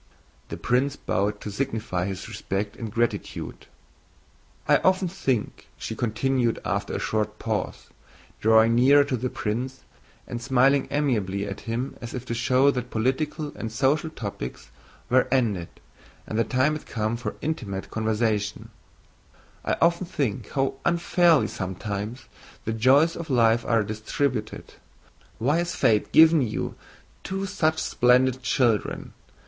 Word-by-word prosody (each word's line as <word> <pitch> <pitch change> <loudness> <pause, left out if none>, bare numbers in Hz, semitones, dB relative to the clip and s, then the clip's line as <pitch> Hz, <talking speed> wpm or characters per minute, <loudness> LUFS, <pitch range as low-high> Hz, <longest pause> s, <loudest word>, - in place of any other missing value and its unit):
The - - -5
prince 130 +3 +1
bowed 105 -2 -1
to 105 - -5
signify 105 -6 -2
his 95 -1 -5
respect 100 +1 -3
and 115 -4 -6
gratitude. 120 +2 -3 1.0
"I - - +6
often 185 0 +2
think," 135 - -2
she 110 - -5
continued 120 +1 0
after - - -2
a - - -1
short 105 -1 -1
pause, 110 -5 -3 0.5
drawing 110 +1 +5
nearer 135 +4 +6
to 140 -2 -2
the 125 +1 -2
prince 125 +6 -3 0.4
and 120 - -5
smiling 135 +2 +3
amiably 105 -9 0
at 100 -1 -5
him 125 +4 -3
as 120 0 -6
if 125 0 -5
to 120 - -3
show 130 +4 +3
that 125 -2 -4
political 145 +6 -1
and 110 - -5
social 140 +7 +1
topics 100 - -7 0.4
were 130 +1 +3
ended 110 -10 +1 0.6
and 110 - -3
the 115 - +3
time 130 +4 +2
had 155 - -7
come 110 +1 -1
for 120 - -5
intimate 105 -11 -4
conversation—"I 110 -2 -4
often 170 +2 +2
think 130 - -2
how 135 -1 -1
unfairly 170 -2 +3
sometimes 105 +5 -5 0.4
the 110 - -1
joys 135 +8 +4
of 170 -2 -6
life 115 -2 +3
are 115 -2 +2
distributed. 110 +2 -3 0.6
Why 135 +8 +2
has 175 0 -2
fate 105 -2 +2
given 160 -1 +7
you 110 -4 -2 0.5
two 195 +1 -3
such 160 -5 +1
splendid 125 +1 +3
children? 120 -5 0
125 Hz, 135 wpm, -25 LUFS, 110-140 Hz, 1.0 s, given